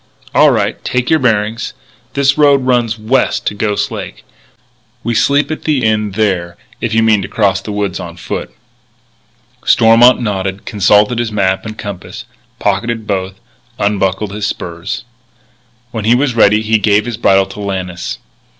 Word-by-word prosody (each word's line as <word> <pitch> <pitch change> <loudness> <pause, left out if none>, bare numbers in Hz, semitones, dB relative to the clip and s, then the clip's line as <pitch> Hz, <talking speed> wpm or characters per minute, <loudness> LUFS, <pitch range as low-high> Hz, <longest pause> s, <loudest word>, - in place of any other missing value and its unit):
"All - - +6
right. - - -1
Take 125 +2 -1
your 160 - +4
bearings. 110 -3 0 0.4
This 140 0 +3
road 140 -3 +4
runs 120 -3 +1
west 110 +5 0
to - - 0
Ghost 105 0 -1
Lake. - - -7 0.8
We 120 - -1
sleep 140 +6 +2
at 155 - -4
the 150 -4 +1
Inn 105 -2 0
there 95 -5 -1 0.2
if 115 - -1
you 115 0 +3
mean 110 -2 +3
to - - -5
cross 95 -3 +1
the 105 - -6
woods 100 -3 -2
on 85 0 -8
foot." - - -5 1.1
Stormont 115 +2 +5
nodded, 95 -3 -3
consulted 105 +3 +3
his 120 -2 -1
map 95 0 0
and 110 0 -7
compass, 100 -3 -7 0.3
pocketed 115 -2 -1
both, 95 -2 -2 0.4
unbuckled 100 0 0
his 105 0 -2
spurs. 85 0 -5 0.9
When 110 -3 -4
he 115 +2 +5
was 135 0 +1
ready 110 -1 +4
he 110 0 +2
gave 105 0 +2
his 120 -3 -4
bridle 95 -4 +3
to 95 +2 -11
Lannis. 95 -3 -4
105 Hz, 160 wpm, -14 LUFS, 100-115 Hz, 1.1 s, All